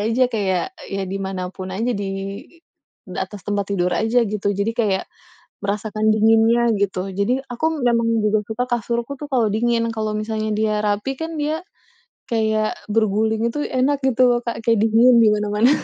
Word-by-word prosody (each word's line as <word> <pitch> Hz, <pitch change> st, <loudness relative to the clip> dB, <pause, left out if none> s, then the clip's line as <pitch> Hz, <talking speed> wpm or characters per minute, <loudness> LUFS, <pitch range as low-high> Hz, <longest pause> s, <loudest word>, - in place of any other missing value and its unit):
aja. 230 Hz, +5 st, +2 dB
Kayak, 195 Hz, -, -1 dB, 0.2 s
ya 195 Hz, 0 st, -3 dB
di 195 Hz, +1 st, -4 dB
mana 190 Hz, -1 st, -3 dB
pun 185 Hz, 0 st, -7 dB
aja. 225 Hz, +6 st, -1 dB
Di 200 Hz, -3 st, -3 dB, 1.1 s
atas 205 Hz, -3 st, -5 dB
tempat 205 Hz, -1 st, -1 dB
tidur 180 Hz, -2 st, +1 dB
aja, 225 Hz, +5 st, +2 dB
gitu. 205 Hz, -1 st, -2 dB
Jadi 200 Hz, +3 st, -1 dB
kayak, 200 Hz, -5 st, +1 dB, 0.6 s
merasakan 215 Hz, +1 st, 0 dB
dinginnya, 225 Hz, +2 st, +4 dB
gitu. 195 Hz, -1 st, -1 dB
Jadi 200 Hz, +7 st, 0 dB
aku 245 Hz, +5 st, -3 dB, 0.2 s
memang 235 Hz, -2 st, +2 dB, 0.2 s
juga 210 Hz, 0 st, +2 dB
suka 220 Hz, +3 st, -2 dB
kasurku 235 Hz, +3 st, -2 dB
tuh, 295 Hz, -, -6 dB
kalau 240 Hz, -4 st, +3 dB
dingin. 230 Hz, +1 st, +1 dB
Kalau 215 Hz, -1 st, -1 dB
misalnya 215 Hz, 0 st, -2 dB
dia 215 Hz, 0 st, +1 dB
rapi 210 Hz, +6 st, -1 dB
kan, 320 Hz, -1 st, -4 dB
dia 310 Hz, +3 st, -2 dB, 0.7 s
kayak 220 Hz, -2 st, +1 dB, 0.2 s
berguling 220 Hz, +1 st, +1 dB
itu 295 Hz, +5 st, -3 dB
enak, 265 Hz, +3 st, +1 dB
gitu 245 Hz, -1 st, +3 dB
Kak. 235 Hz, -1 st, -3 dB
Kayak 230 Hz, -1 st, +3 dB
dingin, 230 Hz, +3 st, +5 dB
di 220 Hz, -, +6 dB
mana-mana. 210 Hz, +3 st, +2 dB
220 Hz, 165 wpm, -21 LUFS, 205-235 Hz, 1.1 s, di